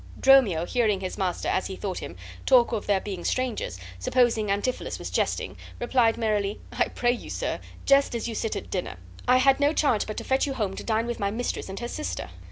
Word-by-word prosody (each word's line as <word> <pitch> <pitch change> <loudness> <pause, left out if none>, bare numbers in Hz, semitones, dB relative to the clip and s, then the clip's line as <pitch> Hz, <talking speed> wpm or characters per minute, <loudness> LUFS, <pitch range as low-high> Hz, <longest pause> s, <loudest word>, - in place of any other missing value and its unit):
Dromio, 235 -12 +5
hearing 215 -2 +1
his 185 - -4
master, 185 -3 -2
as 185 - +1
he 190 - -5
thought 190 -1 -4
him, 85 - -7 0.3
talk 250 -3 +6
of 225 -3 -3
their 200 -2 +3
being 190 -3 -6
strangers, 250 - -1 0.2
supposing 230 - +2
Antipholus 205 +6 -1
was - - -6
jesting, - - -1 0.2
replied, 240 -2 +2
merrily: 210 -3 0
"I - - +1
pray 240 0 +1
you, 245 - -5
sir, - - -2 0.3
jest 275 -2 +4
as 235 - -2
you 230 - -3
sit 225 0 -2
at - - -6
dinner. 180 - -3 0.3
I 250 - +6
had 270 +1 +4
no 285 +1 +3
charge 265 -9 +2
but 215 - -5
to - - -3
fetch 265 +2 +1
you 270 - -3
home 200 -5 -1
to - - -6
dine 225 0 0
with 240 0 -4
my 200 - 0
mistress 225 -1 -3
and 195 - -5
her 240 - -2
sister." 90 - -4
225 Hz, 220 wpm, -26 LUFS, 195-250 Hz, 0.3 s, talk